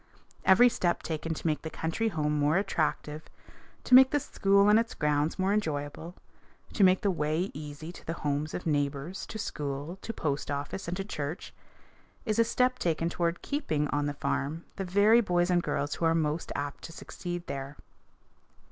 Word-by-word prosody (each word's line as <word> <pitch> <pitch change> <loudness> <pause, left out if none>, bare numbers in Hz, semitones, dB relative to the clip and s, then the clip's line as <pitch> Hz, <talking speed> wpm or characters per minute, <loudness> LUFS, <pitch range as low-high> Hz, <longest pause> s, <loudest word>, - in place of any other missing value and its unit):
Every 200 +6 +7
step 175 -7 0
taken 160 0 -3
to - - -9
make 155 -2 +1
the 160 - -5
country 165 +9 -2
home 150 -7 0
more 150 +4 +3
attractive, 155 -5 -1 0.6
to - - -1
make 260 +1 +10
the 290 - +1
school 200 -5 +3
and 210 +1 +6
its 230 0 -2
grounds 150 +1 0
more 190 +1 +1
enjoyable, 160 -3 -3 0.6
to 205 - +3
make 185 0 +5
the 200 - +2
way 160 +3 -1
easy 150 +2 -7
to - - -14
the 165 - -1
homes 145 +2 -1
of 180 - -5
neighbors, 145 +3 -2
to 220 - -6
school, 145 -2 -4
to - - -4
post 150 -9 -2
office, 145 +6 -4
and 175 +1 -3
to 195 - -2
church, 155 -4 -5 0.7
is 215 -1 0
a - - +7
step 250 +2 +1
taken 165 0 0
toward 170 0 -1
keeping 160 - -1
on 145 0 0
the 145 - -3
farm 145 +3 -2
the 195 - -4
very 205 +5 +5
boys 175 -3 +1
and 175 -1 +3
girls 145 -3 -2
who 170 - -2
are 165 0 +3
most 155 0 -1
apt 145 0 -4
to - - -8
succeed 175 +1 -6
there. 135 +1 -6
165 Hz, 185 wpm, -29 LUFS, 150-195 Hz, 0.7 s, make